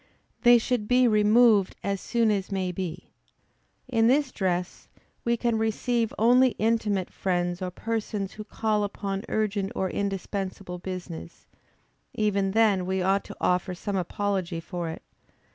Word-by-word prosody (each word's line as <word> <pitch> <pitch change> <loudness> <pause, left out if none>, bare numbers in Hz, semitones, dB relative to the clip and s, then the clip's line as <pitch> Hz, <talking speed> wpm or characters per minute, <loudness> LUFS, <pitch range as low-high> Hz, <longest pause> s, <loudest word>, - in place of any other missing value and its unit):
They 240 -1 +7
should 235 -2 -1
be 250 +1 +4
removed 215 -1 +4
as 200 -1 -2
soon 230 -2 +1
as 200 -1 -2
may 190 -2 -1
be. 180 -1 -6 0.8
In 225 -3 +3
this 270 +2 +3
dress, 180 -2 -2 0.4
we 235 0 +1
can 235 -1 0
receive 225 +1 0
only 250 +3 +4
intimate 215 -4 0
friends 175 -1 -1
or 185 - -2
persons, 210 0 -3
who 215 - -7
call 215 -1 -1
upon 200 -1 -4
urgent 205 -2 -1
or 190 -1 -1
indispensable 195 -2 -4
business; 175 - -7 0.7
even 200 -2 +1
then 205 -5 +3
we 190 0 0
ought 195 +2 +2
to - - -10
offer 180 +1 0
some 200 +3 -4
apology 190 -1 -2
for 170 0 -5
it. 160 - -8
200 Hz, 145 wpm, -26 LUFS, 185-225 Hz, 0.8 s, They